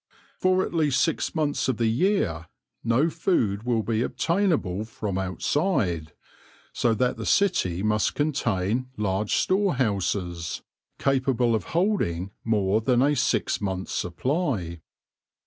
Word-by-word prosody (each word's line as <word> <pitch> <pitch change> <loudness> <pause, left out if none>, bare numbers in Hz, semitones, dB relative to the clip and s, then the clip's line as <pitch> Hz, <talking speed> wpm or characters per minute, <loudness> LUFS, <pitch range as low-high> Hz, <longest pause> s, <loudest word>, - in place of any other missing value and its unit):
For 185 0 +3
at - - -7
least 150 -5 +2
six 165 - 0
months 150 -3 0
of 130 -4 0
the 115 - +1
year 110 - +1 0.4
no 120 +7 +3
food 105 - 0
will 115 -2 0
be 115 0 0
obtainable 160 - 0
from 105 -3 -4
outside, 95 - -1 0.6
so 115 -2 +1
that 125 +3 0
the - - -5
city 105 - +2
must 105 0 +1
contain 120 -5 0
large 100 0 0
store 195 -3 +2
houses 95 -7 -1 0.3
capable 130 -3 +1
of 110 - -1
holding 100 - 0
more 105 -1 +1
than 125 +2 +3
a 145 +1 +3
six - - 0
months* 95 -2 -3
supply. 95 - -2
115 Hz, 130 wpm, -25 LUFS, 95-145 Hz, 0.6 s, For